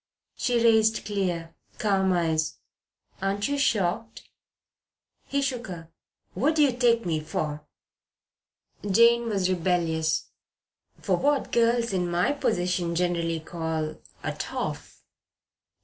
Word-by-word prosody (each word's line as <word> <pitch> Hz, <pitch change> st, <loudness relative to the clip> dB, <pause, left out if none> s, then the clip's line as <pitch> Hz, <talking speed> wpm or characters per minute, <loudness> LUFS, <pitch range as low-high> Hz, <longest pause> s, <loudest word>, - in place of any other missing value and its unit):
She 245 Hz, -, 0 dB
raised 225 Hz, -1 st, +3 dB
clear, 175 Hz, -5 st, -2 dB, 0.2 s
calm 195 Hz, -3 st, +2 dB
eyes. 160 Hz, -3 st, 0 dB, 0.6 s
"Aren't 200 Hz, +1 st, 0 dB
you 285 Hz, 0 st, -1 dB
shocked?" 225 Hz, -3 st, 0 dB, 1.0 s
He 280 Hz, 0 st, 0 dB
shook 255 Hz, -3 st, -2 dB
her. 165 Hz, -3 st, -8 dB, 0.4 s
"What 305 Hz, +4 st, +1 dB
do 305 Hz, -, +5 dB
you 265 Hz, -4 st, +2 dB
take 235 Hz, -2 st, +3 dB
me 160 Hz, -3 st, 0 dB
for?" 150 Hz, -1 st, -4 dB, 1.2 s
Jane 235 Hz, +3 st, +5 dB
was 195 Hz, -4 st, +1 dB
rebellious. 165 Hz, -3 st, 0 dB, 0.7 s
"For -, -, +1 dB
what 290 Hz, -1 st, +1 dB
girls 235 Hz, -1 st, +2 dB
in 180 Hz, -2 st, 0 dB
my 175 Hz, +7 st, +2 dB
position 180 Hz, -9 st, 0 dB
generally 170 Hz, -2 st, 0 dB
call 160 Hz, -1 st, -3 dB, 0.3 s
a -, -, -1 dB
'toff.' -, -, -5 dB
190 Hz, 115 wpm, -26 LUFS, 170-235 Hz, 1.2 s, do